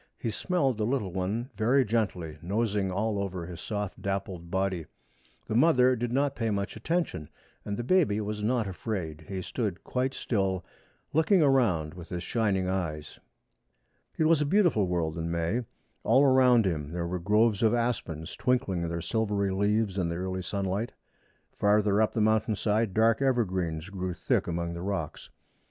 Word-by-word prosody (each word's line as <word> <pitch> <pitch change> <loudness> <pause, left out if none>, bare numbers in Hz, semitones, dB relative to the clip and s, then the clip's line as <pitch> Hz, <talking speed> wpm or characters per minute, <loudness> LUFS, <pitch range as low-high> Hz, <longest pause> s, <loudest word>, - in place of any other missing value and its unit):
He 115 - -3
smelled 135 - 0
the - - +1
little 120 -8 -1
one 105 +8 -2
very 125 +4 +3
gently, 95 -8 -2
nosing 100 0 0
all 100 +2 -1
over 95 -3 -4
his 85 -1 -8
soft 105 -2 -4
dappled 95 -3 -3
body. 95 -3 -1 0.6
The - - -4
mother 130 -1 +5
did 120 0 -3
not 140 +2 +1
pay 115 -2 -1
much 100 -1 -2
attention, 115 - -2 0.3
and 100 0 -4
the 120 - -2
baby 145 - +3
was 105 0 -3
not 115 0 +1
afraid. 85 -4 -4
He 95 -2 -4
stood 105 -6 -3
quite 130 +1 -1
still, 95 -5 -1 0.5
looking 160 +3 +4
around 110 - +2
with 90 -1 -10
his 90 0 -4
shining 100 -5 0
eyes. 80 -5 -3 1.0
It - - +2
was 155 -1 +4
a - - +2
beautiful 170 - +3
world 85 -2 -1
in 85 0 -2
May. 85 +8 0 0.4
All 135 - +5
around 130 -4 +5
him 75 -5 -2
there 85 -1 -2
were 90 +1 -3
groves 105 +3 +2
of 115 0 +4
aspens 95 -9 -2
twinkling 100 -10 0
their 85 0 -3
silvery 100 -1 0
leaves 100 0 +1
in 85 -2 0
the 85 - -3
early 95 +1 -3
sunlight. 100 +4 -2 0.6
Farther 105 0 +3
up 110 - +2
the 110 - 0
mountain 110 0 +2
side 105 -1 0
dark 110 +2 +3
evergreens 95 -10 0
grew 95 -2 -3
thick - - 0
among 85 0 -2
the 85 - -6
rocks. 90 -5 -4
100 Hz, 170 wpm, -28 LUFS, 90-115 Hz, 1.0 s, mother